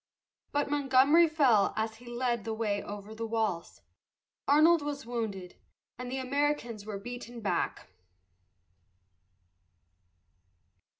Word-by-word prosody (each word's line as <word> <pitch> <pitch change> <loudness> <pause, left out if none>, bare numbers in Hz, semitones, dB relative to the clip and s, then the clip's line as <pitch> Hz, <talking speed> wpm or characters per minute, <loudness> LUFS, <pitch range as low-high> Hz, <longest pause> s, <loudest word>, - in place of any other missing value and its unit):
But 290 0 0
Montgomery 290 +4 +5
fell 260 -10 +3
as 220 0 -2
he 240 +1 -15
led 240 -2 -1
the 225 -1 -3
way 210 -3 -1
over 205 +1 -8
the 225 +1 -4
walls, 220 -6 -2 0.7
Arnold 310 +3 +5
was 290 -3 -4
wounded, 215 -7 -4 0.4
and 250 0 -7
the 265 - -2
Americans 260 -5 -1
were 210 -2 -4
beaten 240 +2 -8
back. 210 -3 -2
240 Hz, 110 wpm, -30 LUFS, 220-280 Hz, 0.7 s, Montgomery